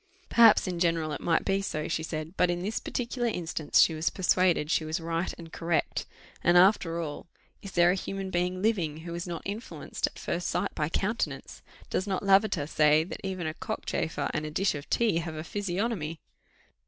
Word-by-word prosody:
"Perhaps 230 -2 +6
in 180 -2 -3
general 165 -2 +1
it - - -4
might 165 -1 +1
be 195 0 +1
so," 155 -5 -3
she 160 - -1
said; 160 0 -5
"but 180 - +3
in 175 0 -1
this 210 +3 -2
particular 240 0 -2
instance 165 -7 0
she 165 - +6
was 160 +1 0
persuaded 180 -4 +2
she 160 - +2
was 155 +1 -2
right 165 +1 -2
and 165 -1 -11
correct; 165 -1 -1 0.4
and 175 +1 +5
after 180 -3 +4
all, 155 0 -5 0.3
is 195 - -9
there 175 0 +5
a - - +2
human 195 0 -4
being 180 +1 -1
living 170 -9 0
who 170 +1 -7
is 170 +1 -4
not 170 -2 -5
influenced 210 +5 -3
at - - -11
first 175 +1 -3
sight 190 +3 -1
by 150 0 -1
countenance! 210 +6 -2 0.3
Does 190 - -1
not 190 -1 -1
Lavater 195 -5 +3
say 150 0 +4
that 170 - -8
even 185 -3 -3
a 155 - -2
cockchafer 195 -4 -3
and 150 - -1
a 155 - -4
dish 190 +6 +1
of 145 -1 -7
tea 225 -7 +2
have 160 -1 -5
a 155 - -5
physiognomy?" 185 -3 -2
175 Hz, 200 wpm, -28 LUFS, 160-195 Hz, 0.4 s, Perhaps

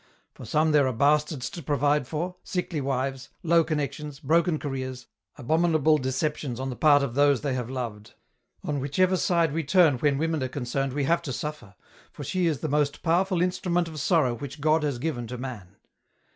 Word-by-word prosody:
For - - -11
some 155 +1 +2
there 145 -3 +4
are 130 - -1
bastards 145 +2 +1
to 175 - -7
provide 145 -1 +1
for, 170 +5 -3
sickly 175 -4 -3
wives, 135 0 -2
low 170 0 +4
connections, 150 -2 -4
broken 165 +2 +2
careers, 130 -3 -5 0.3
abominable 155 +2 +2
deceptions 130 -1 -2
on 130 0 -3
the - - -5
part 145 +1 +5
of 130 -4 -3
those 140 -1 +3
they 140 -2 -1
have 125 -2 -3
loved. 115 -5 -6 0.5
On 145 -1 -2
whichever 180 +8 +1
side 170 -4 +1
we 165 +1 -1
turn 155 -4 +4
when 145 -1 +2
women 160 0 -1
are 130 - 0
concerned 135 0 -3
we 145 0 -1
have 170 +4 +2
to 155 -5 -5
suffer, 130 -7 -6 0.4
for - - -8
she 185 -2 0
is 155 -5 -1
the 155 - -1
most 145 0 0
powerful 180 +1 +2
instrument 175 -1 0
of 155 -2 -7
sorrow 145 -5 +2
which 140 +5 -7
God 155 +2 +3
has 145 -4 -1
given 120 -3 -3
to 125 +2 -6
man. 110 -7 -8
145 Hz, 190 wpm, -26 LUFS, 130-160 Hz, 0.5 s, part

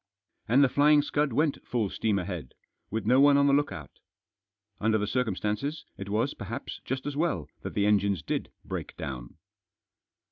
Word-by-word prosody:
And 125 +5 +5
The - - +6
Flying 145 +3 +5
Scud 145 -1 0
went 150 +4 +1
full 110 -5 -1
steam 110 -3 0
ahead, 90 -8 -5 0.3
with 110 +1 -3
no 130 +2 +5
one 145 0 +7
on 140 - +4
the 140 - +4
look 145 +1 +2
out 75 -3 -9 0.8
Under 110 +1 +2
the 105 - 0
circumstances, 110 - -1
it 100 0 -7
was, 115 +7 0
perhaps, 105 +3 -6
just 130 +1 -3
as 145 -1 -3
well 145 - 0
that - - -6
the 100 - +2
engines 100 -5 +2
did - - -2 0.2
break - - -5
down. 60 -3 -6
115 Hz, 175 wpm, -28 LUFS, 100-140 Hz, 0.8 s, one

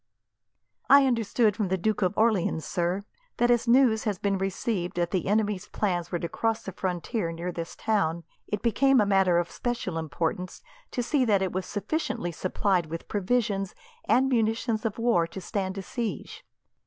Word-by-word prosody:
"I 280 0 +8
understood 230 -3 +2
from 210 -3 -1
the 190 +1 0
Duke 215 +4 0
of 185 +1 0
Orleans, 205 -8 +2
sir, 180 +1 -1 0.3
that 240 0 +3
as 240 0 +2
news 235 -3 +4
has 210 -3 0
been 195 0 0
received 195 -1 -2
that 175 -1 0
the 185 -3 -1
enemy's 205 -2 0
plans 180 -5 -2
were 175 - 0
to 170 - -3
cross 225 +6 -1
the 195 - -5
frontier 180 +1 -2
near 170 +2 -4
this 170 -1 -6
town, 170 -7 0 0.2
it 210 0 -3
became 260 +4 +4
a 210 - +4
matter 190 -3 +3
of 175 0 -1
special 230 -9 -3
importance 165 - -3 0.3
to 245 - -2
see 265 +2 +2
that 200 -4 +3
it 185 - -1
was 185 0 -3
sufficiently 205 - -2
supplied 185 0 0
with 165 +1 -6
provisions, 205 -2 0 0.3
and 265 +2 +3
munitions 225 -2 0
of 220 - -1
war 230 -8 +2
to 180 - -8
stand 190 0 -3
a 195 - -4
siege. 215 - -5
200 Hz, 180 wpm, -27 LUFS, 180-225 Hz, 0.3 s, I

